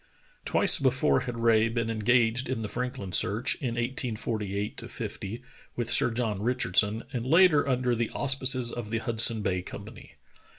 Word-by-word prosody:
Twice - - +3
before 70 -1 +2
had 120 -1 -6
Rae 115 -1 +2
been 115 0 -2
engaged 120 +2 +1
in 120 -4 -3
the - - -3
Franklin 120 -4 -5
search, 105 +6 +2
in 120 -4 -3
1848 110 -4 -3
50 115 +6 -6 0.3
with 120 -1 -3
Sir - - +4
John 115 -4 -3
Richardson, 110 -2 +1
and 120 -3 -3
later 155 0 +4
under 125 -1 0
the 115 -1 -2
auspices 130 -3 +1
of 120 -3 -6
the 115 - -2
Hudson 115 -1 +3
Bay 90 -2 -1
Company. - - -11
115 Hz, 155 wpm, -27 LUFS, 110-125 Hz, 0.3 s, Sir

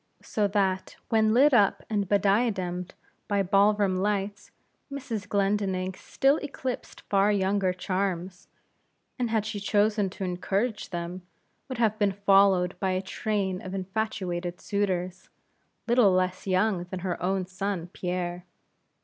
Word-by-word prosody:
So 210 -2 0
that 195 -2 0
when 220 -1 +3
lit 270 +5 +5
up 205 -5 +4
and 205 -3 -1
bediademed 195 -3 +1 0.3
by 200 -2 +1
ball 200 +2 +4
room 195 -3 +1
lights, 205 +1 -2 0.4
Mrs. 230 -8 -5
Glendinning 195 -2 0
still 275 +9 +1
eclipsed 265 -4 -5
far 200 +1 +2
younger 195 -1 +1
charms, 185 -1 -3 0.7
and 245 -2 0
had 220 -2 +1
she 215 -1 -4
chosen 205 0 +2
to 195 - -7
encourage 195 +5 -1
them, 175 +1 -5 0.5
would 260 - -4
have 220 -2 +1
been 200 -2 +2
followed 195 -2 +4
by 190 -2 0
a 185 - 0
train 190 -1 -2
of 185 +1 -6
infatuated 185 -3 -3
suitors, 185 -2 -2 0.6
little 235 -4 +5
less 185 +1 0
young 185 -1 +1
than 180 0 -6
her 180 -1 -3
own 190 +1 0
son 185 -1 -3
Pierre. 180 0 -3
195 Hz, 135 wpm, -27 LUFS, 185-210 Hz, 0.7 s, lit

